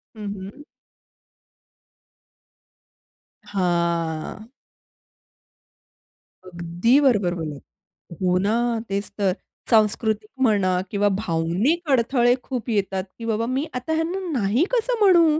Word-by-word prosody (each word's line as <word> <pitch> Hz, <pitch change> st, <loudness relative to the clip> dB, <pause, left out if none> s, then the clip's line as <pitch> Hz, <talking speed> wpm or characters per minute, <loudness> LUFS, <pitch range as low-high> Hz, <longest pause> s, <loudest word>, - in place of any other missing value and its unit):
हं, 215 Hz, -, -7 dB
हं. 200 Hz, +9 st, -9 dB, 2.8 s
हां. 170 Hz, +1 st, -1 dB, 2.0 s
अगदी 175 Hz, +8 st, +1 dB
बरोबर 205 Hz, -10 st, +3 dB
बोललात. 155 Hz, -4 st, -5 dB, 0.6 s
हो 180 Hz, -1 st, +2 dB
ना, 200 Hz, +3 st, +1 dB, 0.4 s
तेच 200 Hz, +1 st, -2 dB
तर. 195 Hz, -2 st, +2 dB, 0.4 s
सांस्कृतिक 215 Hz, -1 st, +2 dB
म्हणा, 200 Hz, -7 st, +3 dB
किंवा 205 Hz, 0 st, +2 dB
भावनिक 205 Hz, -, 0 dB
अडथळे 245 Hz, -1 st, +3 dB
खूप 250 Hz, -2 st, -4 dB
येतात, 195 Hz, -3 st, 0 dB, 0.2 s
की 230 Hz, -, -6 dB
बाबा 225 Hz, 0 st, 0 dB
मी 260 Hz, +5 st, -1 dB
आता 250 Hz, +6 st, -2 dB
ह्यांना 325 Hz, +4 st, -1 dB, 0.2 s
नाही 210 Hz, +8 st, +2 dB
कसं 485 Hz, 0 st, +1 dB
म्हणू? 340 Hz, -6 st, +5 dB
210 Hz, 95 wpm, -23 LUFS, 185-260 Hz, 2.8 s, म्हणू